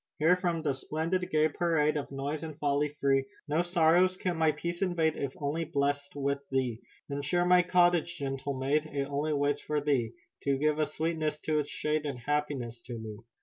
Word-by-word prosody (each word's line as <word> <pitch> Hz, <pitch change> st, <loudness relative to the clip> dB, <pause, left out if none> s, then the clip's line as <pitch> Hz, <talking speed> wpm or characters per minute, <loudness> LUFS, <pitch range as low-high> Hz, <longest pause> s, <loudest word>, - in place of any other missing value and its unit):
"Here 165 Hz, +4 st, +5 dB
from 175 Hz, -3 st, -1 dB
the 145 Hz, -3 st, +1 dB
splendid, 165 Hz, +7 st, -2 dB
gay 155 Hz, 0 st, +3 dB
parade 155 Hz, -1 st, +1 dB
Of 145 Hz, -, -3 dB
noise 140 Hz, +2 st, -3 dB
and 155 Hz, -3 st, -7 dB
folly 145 Hz, 0 st, 0 dB
free 135 Hz, -1 st, +3 dB, 0.2 s
No 155 Hz, +3 st, +2 dB
sorrows 175 Hz, +1 st, +3 dB
can 180 Hz, -2 st, -1 dB
my 160 Hz, -1 st, +3 dB
peace 170 Hz, +4 st, -4 dB
invade 165 Hz, -4 st, +1 dB
If 140 Hz, -1 st, -3 dB
only 150 Hz, +3 st, -1 dB
blessed 145 Hz, -1 st, -1 dB
with 140 Hz, 0 st, 0 dB
thee. 130 Hz, -4 st, 0 dB, 0.3 s
"Then 140 Hz, 0 st, -3 dB
share 175 Hz, +5 st, +1 dB
my 180 Hz, 0 st, +6 dB
cottage, 175 Hz, -1 st, +3 dB
gentle 135 Hz, -1 st, -3 dB
maid, 145 Hz, +4 st, +1 dB
It 140 Hz, -2 st, -2 dB
only 145 Hz, +2 st, -1 dB
waits 145 Hz, 0 st, +1 dB
for 150 Hz, 0 st, -1 dB
thee 135 Hz, -6 st, 0 dB, 0.3 s
To 140 Hz, -1 st, +2 dB
give 150 Hz, +2 st, +1 dB
a 155 Hz, -, +2 dB
sweetness 155 Hz, -2 st, -2 dB
to 155 Hz, -1 st, +1 dB
its 145 Hz, -, -3 dB
shade 150 Hz, 0 st, -1 dB
And 140 Hz, -3 st, -3 dB
happiness 130 Hz, -3 st, -2 dB
to 120 Hz, -2 st, -5 dB
me." 110 Hz, -2 st, -7 dB
150 Hz, 195 wpm, -30 LUFS, 140-165 Hz, 0.3 s, my